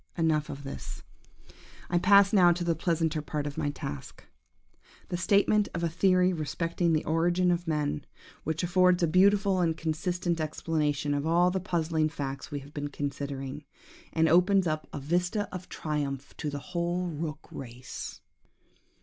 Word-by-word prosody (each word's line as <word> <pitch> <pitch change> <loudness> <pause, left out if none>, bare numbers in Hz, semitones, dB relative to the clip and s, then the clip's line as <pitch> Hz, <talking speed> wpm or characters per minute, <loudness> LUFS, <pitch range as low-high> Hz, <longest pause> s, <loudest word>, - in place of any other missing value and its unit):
"Enough 160 -2 +1
of 140 - -7
this. 135 - -7 0.8
I 175 - +2
pass 200 +2 +6
now 180 -4 +7
to 175 +1 -3
the 170 -1 +2
pleasanter 165 -1 0
part 150 -1 -3
of 145 -1 -4
my 145 - -1
task! 70 - -7 0.9
The - - -2
statement 205 +2 +3
of 170 - -2
a 170 - +2
theory 185 +2 +3
respecting 165 +2 -1
the 155 -1 +1
origin 175 +3 +2
of 175 0 -1
men, 150 - -1 0.4
which 160 +2 -2
affords 180 0 +3
a - - +4
beautiful 195 +2 +4
and 165 -2 +1
consistent 170 +1 -1
explanation 150 -2 -1
of 145 +2 -1
all 175 +2 +4
the 190 - -1
puzzling 165 -3 0
facts 140 -3 -5
we 145 -1 -4
have 140 +2 -14
been 145 -1 -3
considering, 140 0 -4 0.5
and 160 0 +3
opens 180 +3 +4
up 155 -1 -2
a - - -5
vista 175 +8 0
of 185 0 -7
triumph 140 -3 -3
to 150 - -3
the 145 - -4 0.2
whole 175 +1 0
rook 155 -2 -5
race!" 125 -1 -8
165 Hz, 160 wpm, -29 LUFS, 150-180 Hz, 0.9 s, now